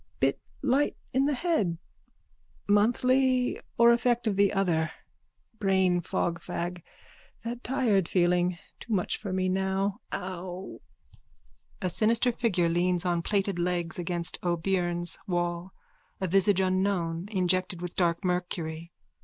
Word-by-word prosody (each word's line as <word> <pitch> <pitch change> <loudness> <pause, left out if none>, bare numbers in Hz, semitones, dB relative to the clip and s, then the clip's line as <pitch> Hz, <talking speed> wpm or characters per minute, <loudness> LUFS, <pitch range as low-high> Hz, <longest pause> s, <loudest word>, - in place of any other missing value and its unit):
_ - - -36
Bit - - +1 0.2
light 280 +2 +2 0.2
in 265 +2 +3
the 290 0 +1
head. 245 - 0 0.9
Monthly 250 +4 +3 0.2
or 235 0 +7
effect 240 0 +1
of 215 -3 +1
the 200 0 +4
other. 170 -5 +1 0.7
Brainfogfag. 180 -2 0 0.6
That 240 +1 -5
tired 225 -9 +1
feeling. 180 0 +2 0.2
Too 230 - -5
much 185 -3 0
for 200 - -5
me 185 0 0
now. 190 +1 0
Ow! 185 0 -6 1.0
_(A 185 -2 +1
sinister 230 +5 +3
figure 220 -8 +1
leans 175 +1 +1
on 175 -1 +1
plaited 195 -1 0
legs 175 -1 -1
against 175 -1 -2
O'Beirne's 175 0 0
wall, 175 0 -2 0.5
a 190 - -1
visage 195 +1 +4
unknown, 185 -2 0
injected 185 -2 0
with 180 0 -6
dark 170 -1 +1
mercury. 170 -2 -2
185 Hz, 120 wpm, -28 LUFS, 175-205 Hz, 1.0 s, or